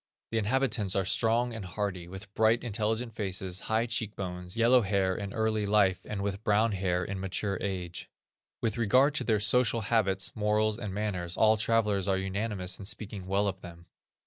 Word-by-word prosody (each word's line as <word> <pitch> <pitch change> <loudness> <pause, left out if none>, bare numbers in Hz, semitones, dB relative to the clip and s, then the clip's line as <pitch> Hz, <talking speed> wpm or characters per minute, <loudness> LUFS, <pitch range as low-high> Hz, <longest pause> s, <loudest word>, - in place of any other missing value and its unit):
The 115 - +1
inhabitants 110 -3 +1
are 95 - +1
strong 115 +4 +1
and 110 -3 -5
hardy, 95 -2 -4
with 95 +2 -10
bright, 110 +2 +3
intelligent 115 +1 -2
faces, 95 -3 -3
high 110 +1 +2
cheek 115 -3 -3
bones, 90 0 -5
yellow 120 +2 +5
hair 95 -2 +1
in 100 0 -5
early 110 -1 0
life, 100 -3 +3
and 100 -2 -4
with 100 +1 -3
brown 110 +1 +3
hair 90 -2 0
in 100 -1 -4
mature 95 +1 -2
age. 90 -3 -4 0.5
With 115 0 -1
regard 130 +6 +4
to 150 - -1
their 110 -2 +1
social 115 +2 +4
habits, 100 -3 +1
morals, 105 +1 +1
and 105 -4 -4
manners, 95 -4 -3
all 110 0 +5
travellers 105 -3 +1
are 95 -1 +2
unanimous 95 -1 -2
in 100 - -8
speaking 100 -2 -4
well 100 +2 +1
of 95 -1 -3
them. 85 0 -11
105 Hz, 180 wpm, -29 LUFS, 95-110 Hz, 0.5 s, yellow